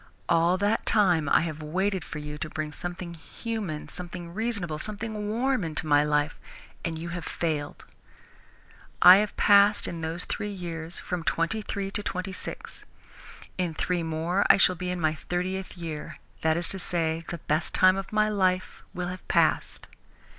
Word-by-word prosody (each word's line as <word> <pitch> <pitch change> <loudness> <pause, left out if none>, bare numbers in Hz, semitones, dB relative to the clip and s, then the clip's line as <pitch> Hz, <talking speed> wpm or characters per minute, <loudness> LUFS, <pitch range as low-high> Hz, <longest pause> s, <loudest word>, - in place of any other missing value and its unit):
All 170 +2 +3
that 205 +3 0
time 175 -8 +3
I - - +5
have 155 -2 -4
waited 185 +4 -1
for - - -7
you 150 0 -6
to 155 - -4
bring 155 0 -4
something 175 +2 -5
human, 180 -1 -5
something 175 -1 -7
reasonable, 205 -8 -2
something 215 +1 -3
warm 250 +1 +1
into 160 -1 -4
my 145 -1 +4
life, 150 0 0 0.4
and 165 -2 -2
you 170 +2 -5
have 170 0 -5
failed. 155 -4 -3 1.1
I 180 +2 +10
have 210 0 -1
passed, 205 +1 +5
in 170 -1 -5
those 160 +2 -2
three 210 - -3
years, 170 -3 -6
from 180 -1 -4
twenty 165 +7 0
three 195 -1 -4
to 205 - 0
twenty 185 -1 -4
six. - - -7 0.8
In 175 -3 -1
three 180 +1 0
more 165 +4 0
I - - +8
shall 190 - +5
be 180 +1 -4
in 180 0 -2
my 155 -2 +2
thirtieth 185 +4 -4
year 160 -3 -6 0.2
that 160 0 +2
is 170 -1 +1
to 190 - +4
say, 165 -2 -1
the 170 - -4
best 155 0 -1
time 185 0 +6
of 195 0 -5
my 215 0 +3
life 185 -3 0
will 180 0 -2
have 185 +1 -8
passed. - - +1
175 Hz, 175 wpm, -27 LUFS, 160-195 Hz, 1.1 s, I